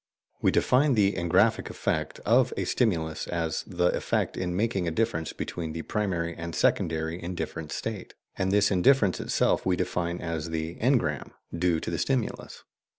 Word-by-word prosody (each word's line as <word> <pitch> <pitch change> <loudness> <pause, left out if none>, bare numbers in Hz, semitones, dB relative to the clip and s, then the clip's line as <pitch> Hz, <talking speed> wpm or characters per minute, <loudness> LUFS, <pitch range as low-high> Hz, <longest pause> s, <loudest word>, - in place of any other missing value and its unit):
We - - +4
define 135 +1 +3
the 100 -2 +3
"engraphic 85 -2 +2
effect" - - -2
of - - +4
a - - -1
stimulus 80 - 0
as 80 -2 -1
the 90 -2 +1
effect - - -1
in 90 -1 -2
making 100 -3 0
a 80 - -3
difference 80 -8 0
between 80 -2 -5
the 80 0 -5
primary 85 -5 -2
and 85 0 -6
secondary 80 +1 0
indifference 85 -2 -5
states, 110 -4 -5 0.2
and 95 0 0
this 100 0 +4
difference 100 +1 +3
itself - - +1
we 95 - +2
define 85 0 -2
as 80 -1 -3
the 80 0 -3
"engram" 115 - 0 0.2
due 85 -1 +1
to - - -4
the 85 - -2
stimulus. 130 -5 -2
90 Hz, 160 wpm, -27 LUFS, 80-100 Hz, 0.2 s, We